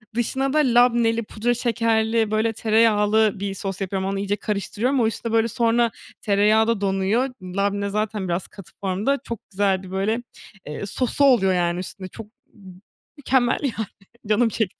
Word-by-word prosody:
dışına 265 +3 -1
da - - +2
labneli, 235 -3 +3
pudra 230 +3 -1
şekerli, 225 -2 +1
böyle 220 +1 +1
tereyağlı 215 -2 +3
bir 200 -1 -3
sos 195 0 -5
yapıyorum. 190 0 -2
Onu 195 - -2
iyice 200 +1 -1
karıştırıyorum. 215 +6 -1
O, 225 - +3
işte, 225 +1 -4
böyle, 225 0 +3
sonra 235 +1 +1 0.3
tereyağı 215 +2 +3
da 230 -3 0
donuyor. 200 +7 +1
Labne 200 +2 -1
zaten 210 -1 -2
biraz 175 +1 -2
katı 195 -4 -14
formda, 200 +9 0
çok 230 -3 -5
güzeldi. 190 -1 0
Eee, - - -11
böyle 210 +5 -1 0.6
sosu 255 +6 0
oluyor, 200 -9 +4
yani, 175 0 0
üstünde. 185 0 -7
Çok 215 +3 -10 0.3
m 190 -5 -14 0.4
mükemmel, 260 -3 +1
yani, 225 -5 -2 0.4
canım 225 +2 +3
çekti. 215 -3 -2
215 Hz, 160 wpm, -23 LUFS, 195-230 Hz, 0.6 s, oluyor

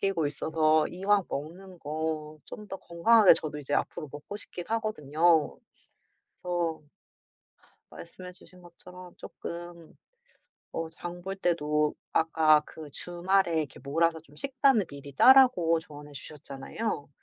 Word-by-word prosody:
...끼고 195 -6 0
있어서 155 +1 +2
이왕 195 +2 +1
먹는 180 +6 -7
거 155 0 -4
좀 210 -1 -10
더 195 - -5
건강하게 195 +5 +5
저도 150 -1 -5
이제 145 0 -3
앞으로 155 -3 -2
먹고 150 +8 -8
싶긴 180 -4 -8
하거든요. 170 -7 +1 0.9
그래서 175 -3 -2 1.1
말씀해 180 -1 -10
주신 180 0 -17
것처럼 180 +1 -13
쪼끔 170 -1 -9 0.8
어 165 0 -3
장 175 +1 -8
볼 195 +1 -5
때도 150 -4 0 0.2
아까 160 -1 +4
그 155 -2 -11
주말에 175 +2 0
이렇게 145 -3 -7
몰아서 165 +4 0
좀 150 -2 -21
식단을 265 - +2
미리 140 -1 -11
짜라고 245 - +6
조언해 150 -2 -12
주셨잖아요. 145 +5 -6
165 Hz, 270 characters per minute, -28 LUFS, 150-185 Hz, 1.1 s, 짜라고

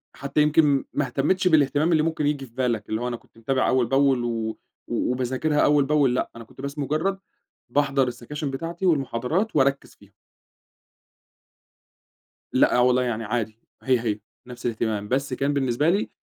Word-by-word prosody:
حتّى 140 +2 0
يمكن 150 -2 +3
ما 145 - 0
اهتمتش 145 +9 +1
بالاهتمام 150 0 +3
اللي 155 -2 +3
ممكن 160 -2 0
ييجي 145 -2 -1
في 115 - -20
بالك، 120 -5 -1
اللي 110 +1 -2
هو 125 - -2
أنا 120 - -2
كنت - - -27
متابع 130 +3 0
أوّل 130 -1 +3
بأول 135 0 +2
و 115 -2 -2 0.3
وباذاكرها 130 +4 -1
أوّل 145 -2 +4
بأول، 140 -3 +2
لأ - - -1
أنا 115 - -9
كنت 120 - -14
بس 140 +2 -5
مجرد 155 +7 -1 0.5
باحضر 140 0 +2
السكاشن 135 +4 -5
بتاعتي 165 +7 -4
والمحاضرات 155 - 0
وأركز 140 -1 +1
فيها. - - -21 2.4
لأ - - +4
والله، 125 +1 +4
يعني 115 -2 -2
عادي 110 0 -3 0.3
هي 130 -3 +3
هي 110 -3 -2 0.3
نفس 125 -1 -10
الاهتمام، 110 -3 -1
بس 135 +3 -1
كان 140 +3 0
بالنسبة 135 +2 +1
لي 195 +4 +1
135 Hz, 165 wpm, -24 LUFS, 120-150 Hz, 2.4 s, أوّل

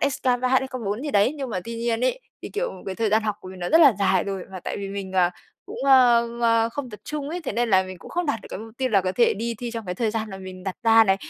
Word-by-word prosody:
HSK 275 - -1
3, 250 0 +2
HSK 265 0 +2
4 205 +6 -2
gì 295 - -3
đấy 205 +5 +3
nhưng 270 -4 -4
mà 185 - -2
tuy 230 - -6
nhiên 230 0 -1
ấy, - - 0 0.2
thì, - - -5
kiểu, - - -2
cái 190 - -3
thời 225 +2 0
gian 220 +1 +3
học 210 -2 -1
của 185 - -10
mình 185 - -10
nó 175 0 -3
rất 325 - +5
là 280 -6 +8
dài 190 -2 +2
rồi 195 -2 -4
mà 185 - -6
tại - - -4
vì 200 -1 -5
mình, 195 -1 -5
à, 180 -2 +3 0.4
cũng, - - -8
ơ, 245 -3 +6
ơ, 230 -1 +3
không 255 +1 -6
tập 210 -2 -10
trung 295 -2 -4
ấy, 355 - -3
thế - - -2
nên 235 0 0
là 190 -1 +5
mình 185 -1 -9
cũng - - -12
không 350 0 -1
đạt 280 -7 -1
được - - -13
cái - - -5
mục 220 +1 -10
tiêu 260 -1 +1
là 205 -4 +4
có 185 0 -2
thể 235 +5 +3
đi 230 +3 -3
thi 240 0 -4
trong 230 -3 -6
cái 180 - -3
thời 220 +2 0
gian 220 0 -3
là 190 - -7
mình 185 -1 -9
đặt 190 -2 -4
ra 225 0 +6
này. 195 -2 +3
225 Hz, 325 wpm, -24 LUFS, 195-255 Hz, 0.4 s, là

